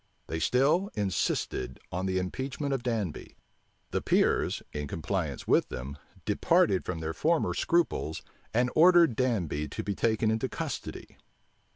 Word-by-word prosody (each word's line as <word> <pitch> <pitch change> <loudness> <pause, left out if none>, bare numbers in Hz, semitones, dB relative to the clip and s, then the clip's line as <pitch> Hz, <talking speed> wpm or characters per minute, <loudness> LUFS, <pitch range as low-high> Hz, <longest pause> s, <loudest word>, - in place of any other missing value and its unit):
They 80 - -3
still 140 - +2
insisted 90 - -1
On 90 +2 -2
the 95 0 0
impeachment 130 +9 -2
of 135 - -1
Danby. 110 -9 -3 0.5
The - - 0
peers, - - +2
in 75 -1 -3
compliance 80 +2 -3
with - - +3
them, 65 +2 -6 0.3
departed 95 -2 +3
from 85 -3 -4
their 80 0 -3
former 160 - +1
scruples, 165 - 0 0.3
and 125 +2 +2
ordered 170 -5 +6
Danby 95 - 0
to - - -5
be 100 - -2
taken 110 +1 +1
into 110 0 -1
custody. - - -6
105 Hz, 140 wpm, -29 LUFS, 80-130 Hz, 0.5 s, ordered